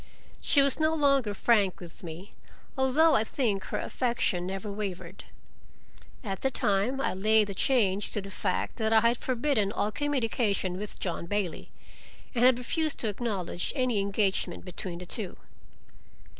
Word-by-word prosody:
She 280 - +4
was 275 +1 +3
no 315 +1 +2
longer 275 -7 +2
frank 205 -4 +2
with 175 -2 -11
me, 175 +4 -9 0.4
although 285 +4 +4
I 220 - +4
think 220 -5 -1
her - - -3
affection 235 -8 -1
never 195 +2 -4
wavered. 200 -3 -6 1.0
At 195 -4 -4
the 270 - +2
time 210 +2 0
I - - 0
laid 215 +2 +3
the - - -3
change 205 -3 +2
to - - 0
the 195 0 -8
fact - - -2
that 220 -2 0
I 220 0 +6
had 235 +1 +3
forbidden 250 -5 0
all 210 - -1
communication 230 -9 -1
with 210 0 -6
John 170 -2 -3
Bailey, 200 -4 -2 0.6
and 240 -2 +1
had 255 -1 +6
refused 310 +5 -1
to 220 - 0
acknowledge 200 -5 -3
any 255 -6 +1
engagement 195 -3 0
between 180 -1 -6
the 180 - -8
two. 195 +1 -4
215 Hz, 155 wpm, -28 LUFS, 195-255 Hz, 1.0 s, I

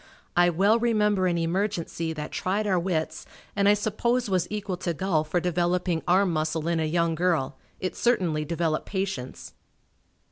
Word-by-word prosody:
I 175 0 +5
well 200 +7 +3
remember 210 -5 +2
an 175 -1 +1
emergency 170 -1 -1
that 150 -1 -6
tried 200 +3 -1
our 190 -3 +2
wits 170 -3 -2 0.3
and 200 0 +3
I 205 - +6
suppose 220 +2 0
was 185 -2 +1
equal 205 -3 -3
to 175 -2 -3
golf 155 -4 0
for 175 - +2
developing 175 0 0
arm 185 0 +3
muscle 155 +1 -1
in 170 -1 +1
a 160 - +1
young 170 +1 +1
girl 165 -5 0 0.2
it 185 - -3
certainly 180 -11 +1
developed 160 0 -1
patience. 190 -10 -4
180 Hz, 165 wpm, -26 LUFS, 165-200 Hz, 0.3 s, I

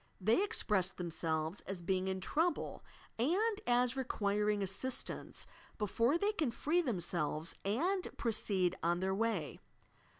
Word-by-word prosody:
They 220 - +3
express 205 - +1
themselves 160 -1 -2
as 190 -3 -5
being 185 +1 0
in 190 0 -2
trouble 325 - 0 0.4
and 405 - +2
as 245 +1 +3
requiring 210 -5 0
assistance 195 +7 -2 0.3
before 230 - +2
they 405 +4 +2
can 315 - 0
free 305 +9 +1
themselves 175 - -1
and 350 - +1
proceed 195 -5 +1
on 170 +1 +2
their 190 0 +1
way. 200 -7 -1
210 Hz, 125 wpm, -35 LUFS, 185-265 Hz, 0.4 s, They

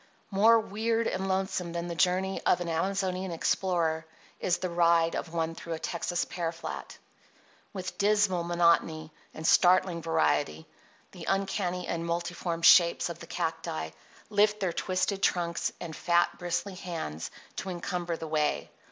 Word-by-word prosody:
More 220 +4 +6
weird 225 +2 -1
and 190 -3 -1
lonesome 190 -2 -1
than 170 0 -3
the 170 - -3
journey 185 +3 +1
of - - +3
an 175 - -4
Amazonian 190 +2 -1
explorer 165 -1 0 0.4
is 175 -1 +1
the 185 - -2
ride 170 -1 +3
of 165 - -4
one 165 -1 -1
through 165 0 -6
a - - -3
Texas 170 +1 -2
pear 170 -2 -3
flat. 165 - -7 0.7
With 185 -1 -6
dismal 205 -4 +3
monotony 170 -2 +2 0.2
and 160 - -6
startling 180 0 +4
variety 155 - +1 0.5
the - - -9
uncanny 190 -2 -1
and 165 0 -2
multiform 170 0 -3
shapes 170 0 +6
of 170 - -7
the - - -10
cacti 160 - -3 0.4
lift 210 +1 +3
their 185 -4 -1
twisted 190 +2 -1
trunks, 170 -3 0
and 165 -3 -6
fat, 175 0 +2
bristly 175 +2 -2
hands 165 - -5 0.3
to 190 - -4
encumber 175 -1 -3
the 160 - -6
way. 150 -1 0
175 Hz, 150 wpm, -29 LUFS, 165-190 Hz, 0.7 s, More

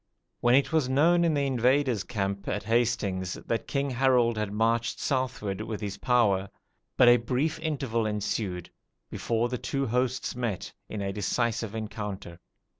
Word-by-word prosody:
When 120 +1 +4
it 140 +3 +2
was 155 -5 +2
known 165 +6 +4
in 165 -3 +2
the 140 -1 +1
invaders' 130 -3 +2
camp 100 -2 -3
at 105 - -2
Hastings 110 -5 0
that 115 - -3
King 140 -1 -1
Harold 125 -2 +3
had 105 -2 -2
marched 115 +2 0
southward 125 -7 -2
with 110 -1 -4
his 100 -2 -5
power, 100 -6 +2 0.5
but 125 - +6
a 120 0 +8
brief 130 +7 -1
interval 135 -8 -1
ensued 100 -4 -3 0.4
before 115 0 0
the 125 -1 -4
two 135 0 -2
hosts 125 +2 -1
met 115 -7 -3 0.2
in 105 - -4
decisive 110 +1 -1
encounter. 105 -5 -6
115 Hz, 150 wpm, -28 LUFS, 105-130 Hz, 0.5 s, a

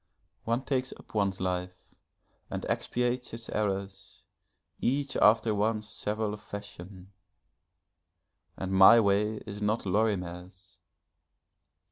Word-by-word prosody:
One 115 +3 0
takes 130 -1 -1
up - - -18
one's 100 -3 0
life 90 0 -4 0.6
and - - -4
expiates 125 -1 -1
its 115 0 -7
errors, 100 -2 -3 0.6
each 135 +2 0
after 110 +1 +4
one's 105 +1 0
several 105 0 -3
fashion 100 -2 -10 1.5
and 95 0 -4
my 95 +5 +8
way 105 +1 +1
is 105 -1 -7
not 105 +2 0
Lorimer's. 95 -2 -2
105 Hz, 100 wpm, -29 LUFS, 95-115 Hz, 1.5 s, my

